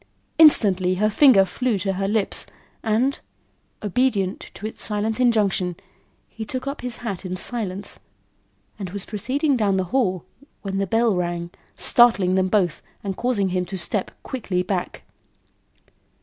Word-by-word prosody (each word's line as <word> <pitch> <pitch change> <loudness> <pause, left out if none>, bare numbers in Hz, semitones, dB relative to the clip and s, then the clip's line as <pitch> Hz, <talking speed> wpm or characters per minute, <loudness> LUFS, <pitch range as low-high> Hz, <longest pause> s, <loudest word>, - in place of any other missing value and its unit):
Instantly 195 - +6
her 215 +3 +1
finger 230 -5 +6
flew 230 +4 -1
to 195 +1 -1
her 195 +1 -2
lips 210 -1 -1 0.3
and, 240 +6 +1 0.6
obedient 205 -3 0
to 210 - -8
its 220 - -6
silent 215 +2 -1
injunction, 205 -7 +2 0.5
he 225 - -8
took 255 +4 -5
up 275 +1 -4
his 250 -1 -4
hat 200 -5 -4
in 185 -1 -4
silence, 200 -3 -3 0.8
and 190 -3 -5
was 200 +1 -5
proceeding 260 +7 0
down 205 -5 +1
the 190 - +1
hall, 190 -10 +1 0.4
when 195 -1 -3
the 195 - 0
bell 225 +1 +2
rang, 175 -1 -3 0.2
startling 225 -7 +4
them 185 0 +2
both 185 -4 +1 0.2
and 195 -2 -3
causing 215 -5 0
him 180 0 0
to 185 +2 -6
step 185 +2 -2
quickly 195 -8 -2
back. 180 -1 -3
200 Hz, 150 wpm, -23 LUFS, 185-235 Hz, 0.8 s, Instantly